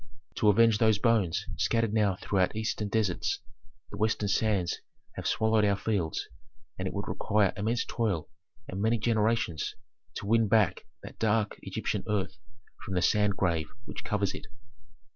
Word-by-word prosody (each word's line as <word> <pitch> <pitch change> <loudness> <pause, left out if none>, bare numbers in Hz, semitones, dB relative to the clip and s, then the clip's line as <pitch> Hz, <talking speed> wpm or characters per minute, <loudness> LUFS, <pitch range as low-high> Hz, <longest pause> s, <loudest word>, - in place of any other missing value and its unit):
"To 105 - +4
avenge 115 +1 +5
those 110 -3 +4
bones 105 -7 +1
scattered 115 -2 +1
now 105 -4 +2
throughout 95 0 0
eastern 110 -1 -2
deserts, 100 -4 0 0.5
the - - -7
western 110 -1 0
sands 100 -4 +1 0.3
have - - -4
swallowed 110 -1 +2
our 100 -1 +3
fields, 95 -5 -2 0.5
and 95 - -2
it - - -4
would 100 0 -3
require 105 -3 +1
immense 110 +4 0
toil 100 -9 -1 0.4
and 95 - -4
many 115 +2 +2
generations 110 - 0 0.4
to - - -5
win 115 +1 +3
back 100 -4 +2 0.2
that - - -11
dark 110 -1 +1
Egyptian - - -3
earth 100 -1 -1 0.4
from 95 - -4
the 90 - +2
sand 105 -2 +2
grave 85 -6 0 0.2
which - - -7
covers 100 -2 0
it." - - -8
105 Hz, 155 wpm, -29 LUFS, 95-110 Hz, 0.5 s, avenge